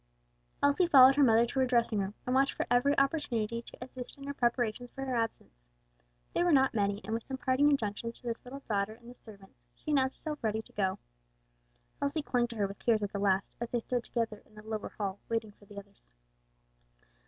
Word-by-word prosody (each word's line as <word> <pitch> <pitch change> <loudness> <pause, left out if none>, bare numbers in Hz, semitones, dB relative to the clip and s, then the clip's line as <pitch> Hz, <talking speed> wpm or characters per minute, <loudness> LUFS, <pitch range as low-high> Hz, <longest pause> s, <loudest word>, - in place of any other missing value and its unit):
Elsie 285 +6 +4
followed 265 -4 +8
her 290 - +3
mother 230 -3 +6
to 250 +3 -3
her 260 - +4
dressing 235 -3 +2
room, 195 +1 -3
watched 265 +2 +2
for - - -2
every 275 +4 +3
opportunity 235 -6 0
to - - -13
assist 250 0 -8
in 275 - -11
her 280 - -4
preparations 240 -1 0
for 270 +2 -6
her 260 -2 -2
absence. 230 -1 -2 0.8
They - - +2
were 350 - +3
not 270 -3 +4
many, 200 -1 0
and 220 - -3
with 230 - -1
some 265 +3 -5
parting 260 +3 +3
injunctions 230 -3 -1
to - - -26
this 235 -1 -4
little 275 +2 -9
daughter 205 0 0
and 235 +1 -14
the - - -11
servants, 200 - -15 0.2
she 305 - -5
announced 265 -2 +2
herself 300 -4 -6
ready 220 0 0
to - - -19
go. 190 -2 0 1.0
Elsie 285 +2 -1
clung 245 -4 +1
to 235 - -9
her 205 -2 +1
with 195 0 -7
tears 220 -3 +2
at 200 - -3
the 200 - -2
last, 195 -1 +1
as 235 - -3
they 240 - 0
stood 245 +1 -2
together 225 -4 -3
in 215 - -24
the 215 - -11
lower 220 -1 -4
hall 200 -2 -4
waiting 225 -2 -1
for 205 - -21
the 200 0 -14
others. 200 0 -13
235 Hz, 220 wpm, -31 LUFS, 210-265 Hz, 1.0 s, followed